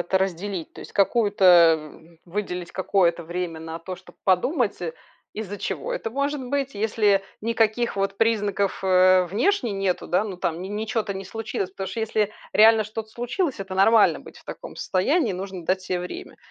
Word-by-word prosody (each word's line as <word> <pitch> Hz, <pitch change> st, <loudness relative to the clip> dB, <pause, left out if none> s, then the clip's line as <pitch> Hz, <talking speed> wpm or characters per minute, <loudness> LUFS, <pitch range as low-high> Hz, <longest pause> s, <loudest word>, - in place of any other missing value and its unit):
это 190 Hz, +2 st, +1 dB
разделить. 190 Hz, -1 st, -3 dB
То -, -, -11 dB
есть -, -, -11 dB
какую-то, 205 Hz, 0 st, +2 dB
э, 170 Hz, -3 st, +8 dB
м 160 Hz, +2 st, -14 dB
выделить 180 Hz, -1 st, -4 dB
какое-то 180 Hz, -3 st, +1 dB
время 170 Hz, -1 st, -4 dB
на 160 Hz, 0 st, -6 dB
то, 185 Hz, +2 st, -6 dB
чтоб -, -, -17 dB
подумать, 205 Hz, -, +1 dB
э, 165 Hz, -2 st, -3 dB, 0.4 s
из-за 205 Hz, -2 st, -6 dB
чего -, -, -3 dB
это 225 Hz, -, -3 dB
может 280 Hz, +2 st, -1 dB
быть. 275 Hz, -2 st, -1 dB
Если 210 Hz, -1 st, +2 dB, 0.2 s
никаких 225 Hz, +1 st, +1 dB
вот 195 Hz, 0 st, -1 dB
признаков, 205 Hz, -3 st, +1 dB
э, 185 Hz, 0 st, +5 dB
внешне 240 Hz, -, +1 dB
нету, 195 Hz, -2 st, -1 dB
да, 180 Hz, +4 st, +2 dB
ну, 200 Hz, -4 st, -5 dB
там 165 Hz, -2 st, -2 dB
н 175 Hz, -, -7 dB
ни 215 Hz, -, -2 dB
чё-то 215 Hz, -2 st, -2 dB
не 190 Hz, 0 st, -6 dB
случилось. 215 Hz, -3 st, -4 dB
Потому 190 Hz, 0 st, -5 dB
что, 210 Hz, +4 st, -4 dB
если 215 Hz, -1 st, 0 dB, 0.2 s
реально 220 Hz, 0 st, +6 dB
что-то 215 Hz, +1 st, -6 dB
случилось, 250 Hz, -, -2 dB
это 190 Hz, -1 st, -6 dB
нормально 215 Hz, +3 st, +5 dB
быть -, -, -14 dB
в -, -, -20 dB
таком -, -, -9 dB
состоянии, 240 Hz, -, +1 dB
нужно 185 Hz, -1 st, -6 dB
дать 185 Hz, +2 st, 0 dB
себе 185 Hz, -1 st, -2 dB
время. 350 Hz, -, -7 dB
195 Hz, 185 wpm, -24 LUFS, 180-225 Hz, 0.4 s, э